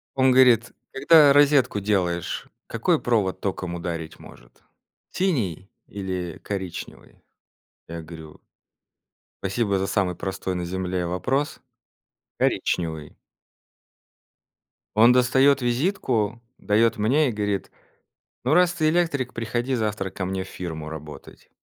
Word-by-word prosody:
Он 130 -1 +4
говорит: 125 -3 +5 0.2
"Когда 145 +1 +6
розетку 140 -6 +4
делаешь, 90 -4 -1 0.2
какой - - 0
провод 100 -6 0
током 90 -3 -3
ударить 85 -2 -5
может? - - -17 0.5
Синий 105 - -1 0.2
или 95 -4 -5
коричневый?" 95 -3 -7 0.7
Я 85 0 -6
говорю 80 -1 -12 1.0
"Спасибо 100 0 0
за 95 - -1
самый 95 -3 0
простой 95 -1 -4
на 90 -1 -3
земле 90 0 -2
вопрос. 135 - -2 0.8
Коричневый". 80 -3 -1 1.8
Он 115 +3 +7
достаёт 130 +2 +4
визитку, 120 - 0 0.2
даёт 110 +2 +2
мне 135 +8 +2
и - - -2
говорит: 105 -2 -2 0.7
"Ну, 130 +5 +1
раз 175 0 +4
ты 155 -2 +1
электрик, 155 -7 0
приходи 120 +3 -2
завтра 105 -4 -2
ко 95 - -5
мне 95 0 -3
в - - -13
фирму 80 -5 -6
работать". 75 -1 -11
105 Hz, 115 wpm, -24 LUFS, 90-130 Hz, 1.8 s, Он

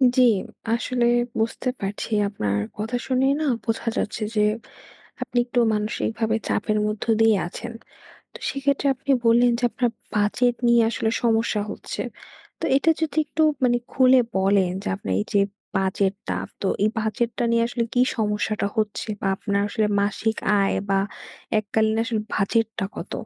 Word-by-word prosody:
জ্বি, 255 - +6 0.5
আসলে 245 0 0 0.3
বুঝতে 230 +3 -1
পারছি। 195 +1 -4 0.2
আপনার 105 - -1 0.2
কথা 225 +4 -2
শুনেই 265 +1 +2
না 310 - 0 0.2
বোঝা 230 0 -1
যাচ্ছে 215 +1 -2
যে, 210 - +3 0.8
আপনি - - -4
একটু 245 0 0
মানসিকভাবে 220 +1 -1
চাপের 215 -1 0
মধ্য 210 0 -3 0.2
দিয়ে 225 -2 +5
আছেন। 235 +6 -7 0.6
তো - - -8
সেক্ষেত্রে 275 0 0
আপনি 270 +2 -6 0.2
বললেন 240 +1 +5
যে, 245 - -2
আপনার 245 -2 0 0.2
বাজেট 215 +4 +2
নিয়ে 235 0 +5
আসলে 225 -1 -1
সমস্যা 225 -2 +2
হচ্ছে। - - -5 0.6
তো - - -3
এটা 280 +4 +3
যদি 315 -2 -2
একটু 315 +1 0 0.2
মানে 240 -1 +4 0.2
খুলে 260 0 +6 0.2
বলেন, 190 -1 +3
যে, - - -3
আপনার 95 - -6
এই 105 - -1
যে, 200 - +5 0.4
বাজেটটা, 195 +1 0 0.3
তো 195 - 0 0.2
এই 215 - +4
বাজেটটা 230 +2 -1
নিয়ে 230 - +3
আসলে 240 -1 -1
কী 245 - +3 0.2
সমস্যাটা 210 -1 0
হচ্ছে? 215 0 -1
বা - - -2
আপনার 200 -1 -1
আসলে 215 0 0
মাসিক 210 +2 0 0.2
আয়, 195 - +2 0.2
বা 195 - +3 0.6
এককালীন 220 +1 +1
আসলে 230 -2 -1
বাজেটটা 220 +1 0
কত? - - -6
225 Hz, 150 wpm, -23 LUFS, 205-240 Hz, 0.8 s, জ্বি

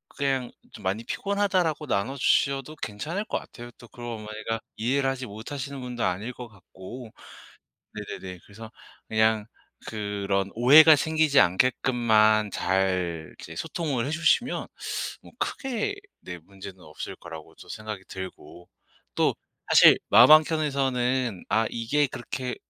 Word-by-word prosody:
그냥 135 -3 -1 0.2
좀 105 - -12
"많이 100 +4 -2
피곤하다."라고 190 -6 0
나눠주셔도 135 +5 0
괜찮을 155 - -4
것 - - -2
같아요. 120 0 -12
또 120 - -14
그걸 120 +2 -11
어머니가 110 -1 -5 0.2
이해를 135 +4 0
하지 135 -1 -4
못하시는 135 +6 -7
분도 125 -2 -4
아닐 105 +7 -2
것 125 0 -9
같고. 110 +3 -11 0.8
네네네. 95 -3 -7
그래서 110 +2 -12 0.4
그냥 110 -1 +2 0.4
그런 100 -2 -2
오해가 150 +7 +8
생기지 155 -1 +3
않게끔만 110 0 +3
잘 90 -4 -1
이제 - - -9
소통을 140 -8 -2
해 - - -3
주시면 165 +10 +1 0.5
뭐 - - -16
크게 270 - -2 0.2
네 90 -1 -8
문제는 95 +2 -12
없을 - - -8
거라고 80 -2 -11
저 - - -15
생각이 110 -3 -7
들고. 90 -2 -9 0.5
또 - - +2 0.4
사실 - - +8
마음 125 +5 +8
한켠에서는 135 - +2
'아 110 +1 +2
이게 140 +6 0
그렇게 125 0 -5
120 Hz, 290 characters per minute, -26 LUFS, 105-140 Hz, 0.8 s, 오해가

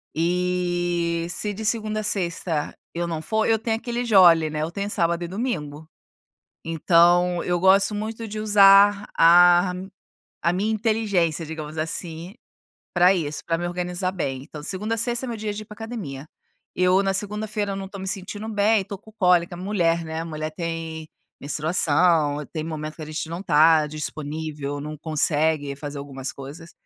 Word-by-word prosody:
E 175 -1 0
se 205 +4 -1
de 220 +2 -6
segunda 215 -1 0
a - - -7
sexta 175 -6 -1 0.2
eu 170 0 -2
não 165 -2 -3
for, 220 +3 0
eu 225 - +3
tenho 225 +1 -1
aquele 240 +1 -3
jolly, 175 -7 +6
né, 150 0 -3
eu 155 - -2
tenho 200 +3 -4
sábado 170 -2 0
e - - -4
domingo. 160 - -4 0.8
Então 175 +2 +3
eu 175 0 +1
gosto 195 +3 +4
muito 220 +2 -5
de 215 0 -7
usar 205 -1 +6
a 175 +2 +6 0.7
a 170 - +2
minha 200 +5 -1
inteligência, 205 -7 0
digamos 155 0 -7
assim, 165 +3 -5 0.6
pra 180 +1 +5
isso, 150 -4 -4
pra 165 -1 0
me 175 +1 -3
organizar 180 +1 -2
bem. 135 -8 -3
Então 150 +1 -10
segunda 210 +7 -2
a - - -7
sexta 240 +2 +2
é - - -4
meu 230 - -4
dia 210 -1 -3
de 210 - -6
ir - - -19
pra 210 - -12
academia. 205 - -7 0.5
Eu 185 +2 +3
na 195 0 0
segunda-feira 210 0 -2
não 195 0 -5
tô 200 +1 -10
me 190 - -6
sentindo 205 +2 -5
bem, 210 0 +2
tô 200 0 -7
com 220 +2 -18
cólica, 180 -5 +2
mulher, 175 -3 0
né. 160 0 -4
Mulher 155 -1 -5
tem 165 -1 -5 0.3
menstruação, 155 0 +2
tem 155 -2 -3
momento 155 -1 -5
que - - -11
a - - -5
gente 155 +1 -5
não 170 +2 -5
tá 160 -3 +4
disponível, 150 -1 -5
não 150 +1 -6
consegue 150 -1 0
fazer 145 0 -7
algumas 135 -2 -6
coisas. 145 +6 -10
175 Hz, 170 wpm, -23 LUFS, 160-200 Hz, 0.8 s, jolly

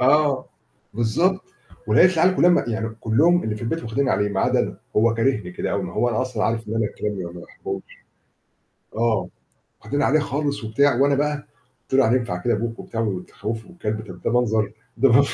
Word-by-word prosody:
آه، 140 0 +3 0.5
بالضبط. 165 - +1 0.5
ولقيت 185 - +5
العيال 180 +3 +4
كُلّها، 175 0 +4
يعني 110 0 -2
كُلُّهم 160 +11 +3
اللي 110 -1 -2
في - - -9
البيت 165 +8 -2
واخدين 130 +4 -1
عليه 105 -4 +1
ما 100 -1 -1
عدا - - +2
أنا. - - -3 0.2
هو 115 +1 +4
كارهني 115 -6 0
كده - - -3
أوي. - - -1
ما - - -6
هو 120 - +1
أنا 115 0 0
أصلًا 125 -4 -2
عارف 115 -1 -1
إن 110 - -3
أنا 115 -1 +1
الكلاب 105 0 -4
ما 85 -2 -5
ما 85 - -9
باحبهمش. - - -6 1.1
آه، 115 -3 +1 0.5
واخدين 145 +1 -2
عليه 150 +3 +3
خالص 145 -2 -2
وبتاع، 125 +4 +2
وأنا 140 0 +4
بقى 150 +1 +1 0.5
قُلت - - -7
له 135 0 +5
يعني 115 +3 +4
ينفع 105 -8 -2
كده 120 -2 +2
أبوك 115 +2 -3
وبتاع 115 - -5
وبتخوِّفه 105 - -4
والكلب، 110 -11 -4
طَب 90 -1 -10
ده - - 0
منظر، 110 -3 +1 0.2
ده 135 -2 +4
منظ 140 +3 +5
115 Hz, 200 wpm, -23 LUFS, 110-140 Hz, 1.1 s, ولقيت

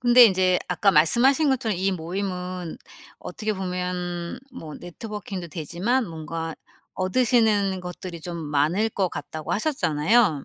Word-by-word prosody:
근데 245 0 +8
인제 185 -3 +4
아까 180 +3 +3
말씀하신 240 - +4
것처럼 240 -6 0
이 195 +1 +1
모임은 180 0 -4 0.4
어떻게 215 -1 -3
보면 180 -2 -3
뭐 160 - -8
네트워킹도 195 -1 -7
되지만 185 - -1
뭔가 165 -1 -5 0.4
얻으시는 205 -2 +2
것들이 180 -1 -7
좀 170 +1 -6
많을 155 +7 +1
것 195 -4 0
같다고 155 +1 -5
하셨잖아요. 200 - +2
185 Hz, 300 characters per minute, -24 LUFS, 170-215 Hz, 0.4 s, 근데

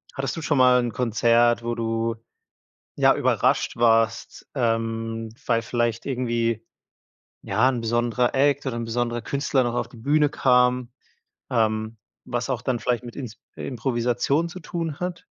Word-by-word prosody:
hattest 135 +1 -2
du - - -4
schon 150 -2 0
mal 125 0 +6
'n 120 - -2
Konzert, 120 0 +2
wo 120 0 -2
du, 115 0 -1 0.8
ja, - - +4
überrascht - - +1
warst, 115 -2 +1
ähm, 115 -1 -1 0.2
weil 115 -1 +2
vielleicht 120 -1 -1
irgendwie, 120 -4 -1 0.8
ja, 110 +6 +2
'n 120 -3 -2
besonderer 120 +2 0
Act 140 +1 +2
oder 125 - -2
'n 115 - -3
besonderer 120 0 -2
Künstler 140 +1 0
noch 120 -1 -1
auf 120 0 -1
die 120 - -14
Bühne 145 +5 +2
kam, 125 -2 +2 0.6
ähm, 110 -1 0 0.3
was 120 +2 -3
auch 125 -2 -1
dann 125 -1 -1
vielleicht 125 0 -1
mit 120 - -9
Ins 125 -6 -7 0.2
Improvisation 125 +5 -1
zu 180 - -8
tun 165 -4 -4
hat? 180 -1 -4
120 Hz, 150 wpm, -24 LUFS, 115-130 Hz, 0.8 s, mal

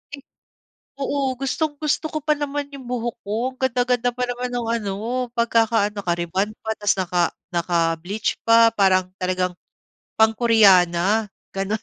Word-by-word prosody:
eh, 280 - -14 0.8
oo 280 +1 -2 0.2
gustong-gusto 300 +3 -1
ko 310 - -3
pa 305 - +4
naman 290 -1 -3
yung 265 -3 -9
buhok 240 -1 -2
ko 205 - -2 0.2
ang - - -26
ganda-ganda 245 -1 +1
pa 250 - -2
naman 245 0 -4
ng 245 -1 -3 0.2
ano, 200 -2 -3 0.4
pagkaka-ano, 225 -3 +2
naka-rebond 175 +3 -1
pa 220 - -5
tapos 205 -1 +2
naka 180 -1 0 0.3
naka-bleach 170 +3 -1
pa 230 0 +6
parang 185 -3 +2
talagang, 185 0 0 0.7
pang-koreana, 215 -3 +4 0.3
gano'n 195 +3 -1
220 Hz, 130 wpm, -22 LUFS, 185-250 Hz, 0.8 s, pa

